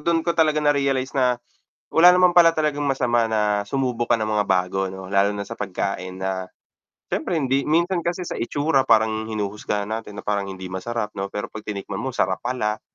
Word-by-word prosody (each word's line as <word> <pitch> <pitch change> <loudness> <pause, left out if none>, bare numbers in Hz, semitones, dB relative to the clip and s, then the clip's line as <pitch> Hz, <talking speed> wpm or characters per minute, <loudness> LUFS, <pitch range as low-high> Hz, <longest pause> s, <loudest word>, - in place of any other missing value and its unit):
dun 165 +1 +1
ko 170 - +3
talaga 155 -1 +4
na-realize 140 -3 +1
na 125 -1 +3 0.5
wala 170 +2 +6
naman 180 -1 +4
pala 170 -1 +8
talagang 150 -2 -1
masama 125 -4 +1
na 105 -1 +1
sumubok 125 -1 -2
ka - - +5
ng 110 - 0
mga 105 -1 +1
bago 95 0 +1
'no 95 0 -8
lalo 100 +1 +3
na 100 0 -5
sa - - -6
pagkain 95 -1 -4
na 95 -1 -3 0.6
syempre 170 - -1
hindi 135 -1 0
minsan 170 +3 +2
kasi 175 +2 -2
sa - - -5
itsura 145 +3 +1
parang 110 0 +3
hinuhusgahan 105 -1 -3
natin 110 -2 -5
na - - -7
parang 100 -1 -1
hindi 95 -1 -7
masarap 110 +3 -3
'no. 100 0 -4
Pero 105 - -4
'pag 110 - -7
tinikman 100 -2 -5
mo, 130 - -3
sarap - - -1
pala. 120 -4 -2
115 Hz, 195 wpm, -23 LUFS, 100-145 Hz, 0.6 s, pala